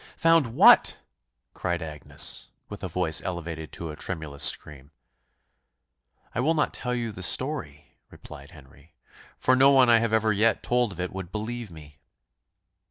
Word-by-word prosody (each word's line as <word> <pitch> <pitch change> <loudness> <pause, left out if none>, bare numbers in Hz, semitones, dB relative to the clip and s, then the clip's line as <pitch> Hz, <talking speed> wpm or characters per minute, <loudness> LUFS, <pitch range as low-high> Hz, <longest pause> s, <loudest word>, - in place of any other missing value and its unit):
"Found 165 -4 +3
what?" 115 - +5 0.6
cried 85 -2 -3
Agnes, 75 -5 -1 0.2
with - - -9
a - - -2
voice - - -1
elevated 85 -3 -6
to 85 -2 -6
a - - -9
tremulous 75 -5 -6
scream. 70 -1 +1 1.4
"I - - -3
will 155 +6 +1
not 150 - 0
tell 125 -1 -3
you 120 -2 -3
the 95 - -10
story," 125 - -2
replied 70 -2 -13
Henry; 70 0 -19 0.4
"for 130 - +2
no 135 +2 +5
one 130 -3 +5
I 115 - +6
have 115 -1 -1
ever 110 -1 +2
yet 110 +2 +1
told 120 -3 0
of 90 - -11
it 90 0 -4
would 95 -2 -7
believe 115 +1 -5
me." 75 -3 -15
95 Hz, 160 wpm, -25 LUFS, 75-120 Hz, 1.4 s, I